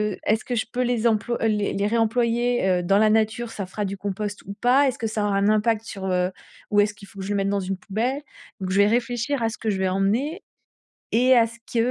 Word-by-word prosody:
heu, - - -19
est-ce 215 +1 +1
que 250 - -3
je 220 - 0
peux 250 - -1
les 240 -1 +1
employ 230 +2 0
les 210 -1 0
les 200 +1 0
réemployer, 235 0 +1
heu, - - -6
dans 195 +3 +3
la 215 0 +4
nature, 225 +2 +1
ça 200 -4 -5
fera 205 +3 -4
du 195 +1 -3
compost 205 +1 -4
ou 200 - -6
pas? 255 +6 +4
Est-ce 255 - -1
que 225 - -1
ça 215 -1 -1
aura 200 -1 +1
un 200 +1 +2
impact, 215 +1 +2
sur 195 -3 -7
heu, 180 0 +1 0.4
où 205 0 +5
est-ce 205 0 +1
qu'il 200 -1 -14
faut 200 -2 -13
que 190 - -5
je - - -6
le - - 0
mette 195 0 0
dans 200 0 0
une 190 0 -3
poubelle? 240 +9 -2 0.4
Donc, 185 -1 -4
je 195 - +1
vais 205 - +5
réfléchir 245 +3 0
à 225 - +2
ce 225 - -7
que 220 - -3
je 195 - 0
vais 190 - +1
emmener 220 - 0 0.7
et 250 +3 +5
à 230 - +6
ce 230 +1 -13
que, 235 - -2
215 Hz, 265 wpm, -24 LUFS, 200-235 Hz, 0.7 s, à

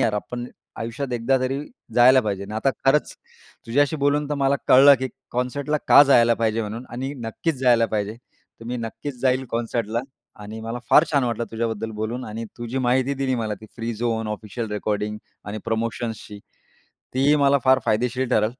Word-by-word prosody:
यार, 110 - +2
आपण 120 +4 -4 0.3
आयुष्यात 125 +3 -4
एकदा 120 +3 +1
तरी 130 +2 -1 0.4
जायला 130 +2 +7
पाहिजे 100 -3 -3
आणि 100 - -9
आता 125 +5 +1
खरंच 140 +3 +2 0.5
तुझ्याशी 145 +6 +2
बोलून 145 0 +1
तर 150 - +1
मला 140 0 +2
कळलं, 140 +2 +8
की 130 - -1 0.2
कॉन्सर्टला 135 +5 -1
का - - +9
जायला 120 -5 +5
पाहिजे 115 0 0
म्हणून 110 +4 -6
आणि 130 +3 -4
नक्कीच 160 +8 -2
जायला 120 -3 +4
पाहिजे. 105 -1 -2 0.5
तर - - -10
मी 125 +1 -3
नक्कीच 125 +3 -6
जाईल 130 0 +1
कॉन्सर्टला 115 -1 -2 0.4
आणि 110 +2 -8
मला 115 +2 -5
फार 155 - +7
छान 140 -3 +3
वाटलं 120 -1 -1
तुझ्याबद्दल 115 -1 -2
बोलून 120 +4 -3
आणि 110 +2 -6
तु 120 - -5
जी 125 +3 -3
माहिती 130 +2 +1
दिली 135 -1 -1
मला, 110 -2 -2
ती 110 +2 -14
फ्री 115 0 -3
झोन 110 -1 -2
ऑफिशियल 105 +2 -5
रेकॉर्डिंग 105 0 -2 0.3
आणि 105 +1 -5
प्रमोशन्सची, 115 -2 -3 0.8
तीही 140 +3 +4
मला 140 -1 +4
फार 130 0 +5
फायदेशीर 125 +3 0
ठरेल. 110 -3 +3
120 Hz, 175 wpm, -23 LUFS, 110-130 Hz, 0.8 s, का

